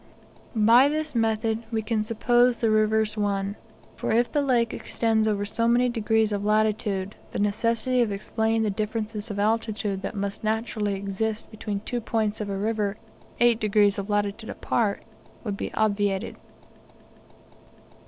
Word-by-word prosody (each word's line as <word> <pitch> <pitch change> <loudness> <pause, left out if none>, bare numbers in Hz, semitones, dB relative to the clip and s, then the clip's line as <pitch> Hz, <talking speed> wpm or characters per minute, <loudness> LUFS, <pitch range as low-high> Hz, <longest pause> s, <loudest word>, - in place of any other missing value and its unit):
By 230 +5 +6
this 310 0 -2
method 225 -1 0
we 225 -1 -1
can 215 0 0
suppose 240 +2 +3
the 225 -2 +1
rivers 215 0 +2
one; 200 -1 -1 0.4
for - - -3
if 235 +2 +2
the 295 - +2
lake 245 -4 +1
extends 220 -1 0
over 205 -1 0
so 230 +3 0
many 245 +1 +3
degrees 220 -2 +1
of 205 -1 -2
latitude, 210 -2 +1 0.2
the - - -5
necessity 230 +5 +1
of 230 -3 +1
explaining 220 +2 0
the 215 - +1
differences 215 +1 -3
of 205 - -4
altitude 210 -2 0
that - - -5
must 200 +1 -4
naturally 215 -2 -1
exist 200 +3 -3
between 210 -2 -4
two 240 +2 -3
points 215 -1 -1
of 205 - -4
a 195 - -2
river 210 0 -1 0.4
8 240 -1 +4
degrees 205 -2 +3
of 200 +1 -5
latitude 205 +2 -1
apart, 210 -4 -1 0.4
would 210 -4 -3
be - - -4
obviated. 205 -2 0
215 Hz, 155 wpm, -25 LUFS, 205-230 Hz, 0.4 s, By